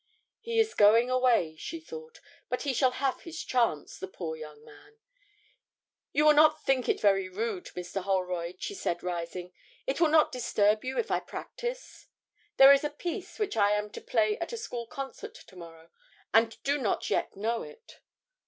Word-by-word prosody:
'He 460 -1 -2
is 445 0 +2
going 225 +4 +5
away,' 245 -11 +2
she 330 - -6
thought; 470 +7 -11 0.3
'but 250 - -2
he 280 -2 0
shall 260 +1 +3
have 270 0 -1
his 335 -1 -7
chance, 230 - 0
the 190 - -5
poor 170 -4 -5
young 150 -1 -11
man.' 425 +2 -17 1.1
'You 300 - +2
will 305 - +8
not 305 +1 +5
think 260 -3 +1
it - - +2
very 195 -2 +2
rude, 205 0 -3
Mr. 180 +2 -4
Holroyd,' 180 -2 -2
she - - -3
said, 175 - -3
rising: 180 0 -5 0.3
'it 275 +5 -2
will 330 - +6
not 310 0 +4
disturb 215 -3 +1
you 260 +1 -4
if 460 - -1
I - - +2
practise? - - -7 0.5
There 270 +1 +10
is 280 - +2
a 295 - 0
piece 345 +5 -6
which 420 -2 -2
I 205 -1 +3
am 210 0 -2
to - - -8
play 215 -3 +1
at 340 - -4
a 470 - -4
school 240 - -5
concert 270 +2 -7
to 185 - -15
morrow, 165 -2 -13 0.4
and 225 0 +3
do 285 +1 +1
not 220 -7 -1
yet - - 0
know 225 +3 -1
it.' 465 0 -13
235 Hz, 185 wpm, -29 LUFS, 190-305 Hz, 1.1 s, There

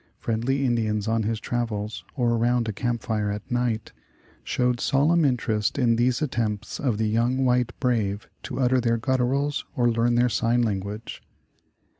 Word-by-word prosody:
Friendly 125 +5 -1
Indians 110 -3 0
on 115 0 +1
his 110 +1 -1
travels, 110 -3 -3
or 120 -4 +1
around 120 0 +1
a 110 - -2
camp 120 +2 -2
fire 105 -2 -1
at 105 +3 -6
night, 120 -3 -1 0.5
showed 125 -1 0
solemn 160 +5 +3
interest 115 -6 0
in 120 -4 +3
these 120 +4 +1
at 145 - -2
tempts 105 -4 -2
of 125 -7 0
the 110 0 0
young 120 +4 +1
white 125 -1 +2
brave 110 -6 0
to - - -5
utter 130 0 +3
their 115 -1 +1
gut 130 +3 0
turals, 140 +4 0
or 120 -3 +3
learn 115 +1 +2
their 120 +1 +4
sign 120 +1 +1
language. 105 +1 -4
120 Hz, 170 wpm, -25 LUFS, 110-125 Hz, 0.5 s, their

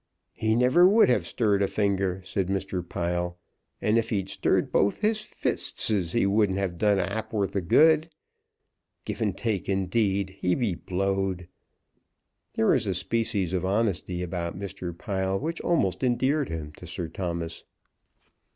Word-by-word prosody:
"He 110 0 0
never 130 +9 +5
would 220 - +5
have 125 - +2
stirred 105 -4 +1
a 100 - +3
finger," 95 -3 0
said 95 0 -2
Mr. 95 -1 -2
Pile; 85 0 -2 0.4
"and 110 +2 +2
if 115 0 -2
he'd 95 -4 -1
stirred - - +1
both 100 - +2
his 215 0 +2
fistesses, 100 - -1
he 120 - +2
wouldn't 100 -1 +2
have 95 -3 -2
done 105 -2 +3
a 95 - +1
ha'porth 100 -1 -2
of 95 -4 -2
good. 160 - +5 1.0
Givantake, 105 -1 -2
indeed! 95 0 0
He 90 - +1
be 115 -7 0
blowed!" 95 0 -2 1.1
There 110 - +1
was - - +3
a 95 - 0
species 105 -2 -1
of 90 -1 0
honesty 95 -3 0
about 85 -1 -4
Mr. 90 -3 -6
Pile 95 +2 -1
which 165 +8 -3
almost 130 - +1
endeared 130 +3 +1
him 80 -2 -5
to 90 - -10
Sir 85 +1 -4
Thomas. 85 -2 -4
100 Hz, 150 wpm, -26 LUFS, 90-110 Hz, 1.1 s, never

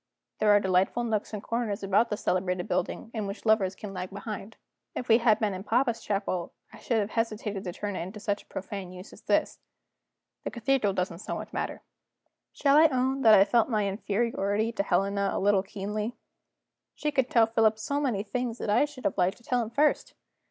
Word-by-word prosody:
There 215 - +3
are 205 0 +7
delightful 190 +5 +1
nooks 220 -3 -1
and 210 -1 -5
corners 230 -4 -2
about 205 +4 +3
this 210 - -4
celebrated 180 -1 0
building 185 +5 -2
in 215 -3 -3
which 200 +3 -7
lovers 205 -4 +3
can 200 -1 -8
lag 185 0 -5
behind. 205 +1 -7 0.4
If 250 - -4
we 225 +1 +6
had 230 -3 +4
been 215 -3 0
in 185 0 -6
papa's 235 +1 +1
chapel 195 -4 -2 0.2
I - - -12
should 235 - 0
have 210 -1 -1
hesitated 215 -3 -2
to 180 - -4
turn 205 +2 -4
it 180 +1 -4
to - - -7
such 205 0 -2
a - - -24
profane 190 -1 -6
use 185 +2 -11
as - - -14
this; - - 0 0.8
the - - -2
cathedral 235 -4 +1
doesn't 180 -3 -2
so - - -4
much - - -7
matter. - - -4 0.7
Shall 280 0 +3
I 320 +1 +8
own 265 -1 0
that 220 -3 +8
I 195 - +7
felt 230 +4 +2
my 210 -4 +1
inferiority 205 +1 -1
to 230 - -1
Helena 200 +1 +1
a - - -1
little 200 0 +3
keenly? 210 +4 -4 0.8
She 300 - -2
could 265 -3 +1
tell 230 -2 +5
Philip 225 -1 +2
so 280 +6 -2
many 235 -8 0
things 240 +1 -3
that 210 - -2
I 250 - +4
should 295 -3 -12
have - - 0
liked 185 +2 +2
to 235 - -22
tell 245 +1 0
him 225 - -3
first. 290 +6 +1
210 Hz, 210 wpm, -28 LUFS, 195-235 Hz, 0.8 s, I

